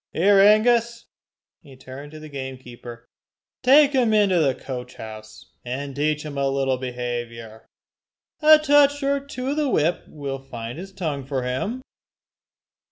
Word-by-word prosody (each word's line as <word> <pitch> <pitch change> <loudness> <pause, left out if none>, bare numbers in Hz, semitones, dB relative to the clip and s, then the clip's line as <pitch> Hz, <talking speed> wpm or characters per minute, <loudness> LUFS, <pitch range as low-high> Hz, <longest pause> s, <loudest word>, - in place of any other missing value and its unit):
"Here 195 +4 +4
Angus," 230 +3 +4 0.6
and - - -18
he 130 - -14
turned 130 +3 -10
to 155 - -9
the 155 - -10
gamekeeper 125 -4 -9 0.5
"take 280 +3 +6
him 240 -5 +2
into 200 -4 +3
the 135 -5 +2
coach 125 -1 -8
house, 110 0 -11
and 135 +2 -5
teach 150 +1 -1
him 145 -2 -5
a 135 0 +1
little 135 -1 0
behaviour. 120 -3 -6 0.7
A 310 0 +8
touch 290 -1 +3
or 280 0 +1
two 270 -2 -6
of 290 - -3
the 300 -2 +1
whip 165 -4 0
will 140 -2 -6
find 120 +1 -7
his 195 +2 -9
tongue 160 -8 -4
for 135 -1 -3
him." 165 - -3
145 Hz, 155 wpm, -23 LUFS, -, 0.7 s, A